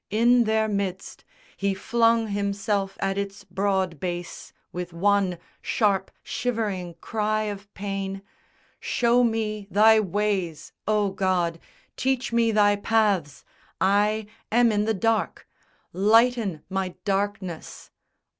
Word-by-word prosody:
In 235 +3 +4
their 220 0 +2
midst 200 -3 -3 0.3
He 195 0 0
flung 230 +2 +2
himself 200 -1 -1
at 195 0 0
its 200 0 -5
broad 190 -5 -1
base, 175 0 -5 0.2
with 180 -1 -6
one 195 0 +2 0.2
Sharp 200 -5 +1
shivering 205 -8 -2
cry 215 0 -1
of 205 -1 -6
pain, 195 -1 -4 0.6
"Show 240 +1 +2
me 215 -3 -1
Thy 220 +2 +6
ways, 195 -5 -1 0.2
O 210 -2 +2
God, 180 -3 0 0.4
teach 260 -2 -1
me 230 -1 +3
Thy 205 -1 +4
paths! 200 -9 +1 0.3
I 210 +3 +2 0.3
am 235 +1 +4
in 210 0 +1
the 220 0 +1
dark! 225 +2 -1 0.5
Lighten 215 -3 +3
my 190 -1 -3
darkness!" 195 -4 -3
205 Hz, 115 wpm, -25 LUFS, 190-220 Hz, 0.6 s, Thy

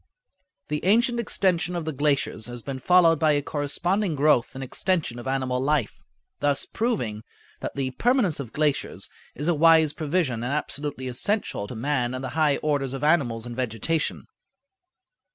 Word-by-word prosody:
The 150 0 -2
ancient 235 +5 +3
extension 180 -6 0
of 170 -2 -3
the 160 - -2
glaciers 140 -5 0
has 120 -1 -7
been 135 -2 -5
followed 165 +1 +5
by 155 -2 +4
a 145 -1 +1
corresponding 170 +6 -1
growth 140 -3 +2
and 135 - -5
extension 150 -2 -1
of 120 - -8
animal 130 -1 -1
life, 145 -3 0 0.4
thus 145 -1 +1
proving 160 - -2 0.4
that - - -5
the 135 -2 -1
permanence 225 - +1
of 125 -5 -6
glaciers 150 -1 -1 0.2
is 145 +4 -3
a 175 - +4
wise 160 -1 +5
provision 150 -6 -1
and 125 +3 -2
absolutely 145 -3 -4
essential 125 - -1
to 120 - -7
man 125 0 -1
and 130 - -5
the 130 - -3
high 150 +1 +2
orders 140 -3 0
of 135 - -5
animals 130 -8 +2
and 120 -1 -7
vegetation. 130 +6 -1
145 Hz, 165 wpm, -25 LUFS, 130-165 Hz, 0.4 s, followed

